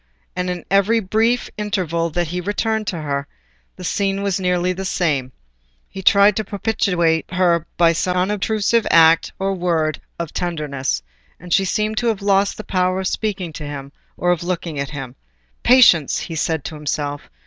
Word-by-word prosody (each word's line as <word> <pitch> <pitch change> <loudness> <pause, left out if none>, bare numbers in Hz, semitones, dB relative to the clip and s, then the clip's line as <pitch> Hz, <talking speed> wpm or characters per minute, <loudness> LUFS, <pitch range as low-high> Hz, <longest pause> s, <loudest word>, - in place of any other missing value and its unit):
And 180 0 -2
in 180 -2 -4
every 200 +4 +4
brief 225 +4 +1
interval 175 -6 -1
that 175 0 -2
he 180 +2 -3
returned 215 +3 -1
to 170 -3 -3
her, 140 -1 -2 0.5
the 185 - -10
scene 195 +1 -1
was 200 -1 0
nearly 180 0 +1
the 190 +1 -5
same: 150 -9 -1 0.6
he 190 - -8
tried 200 +2 +5
to 220 - 0
propitiate 180 -6 0
her 175 -3 +2
by 170 -1 +5
some 180 +2 -1
unobtrusive 210 +4 +1
act 165 0 +5
or 195 0 -1
word 165 -4 -1 0.2
of 170 -2 -5
tenderness, 150 - -2 0.4
and 175 0 -4
she 195 - +3
seemed 215 +3 0
to 240 - -1
have 215 -3 -1
lost 200 0 +2
the 215 - -6
power 185 -1 0
of 190 - -2
speaking 190 -6 -3
to 155 - -7
him, 140 -1 -7 0.3
or 175 - +1
of 175 - 0
looking 170 -4 -3
at 140 -1 -3
him. 135 -4 -7 0.5
"Patience!" 230 - +5
he 165 - -5
said 160 -1 -1
to - - -6
himself. 145 -1 -4
180 Hz, 175 wpm, -20 LUFS, 160-200 Hz, 0.6 s, tried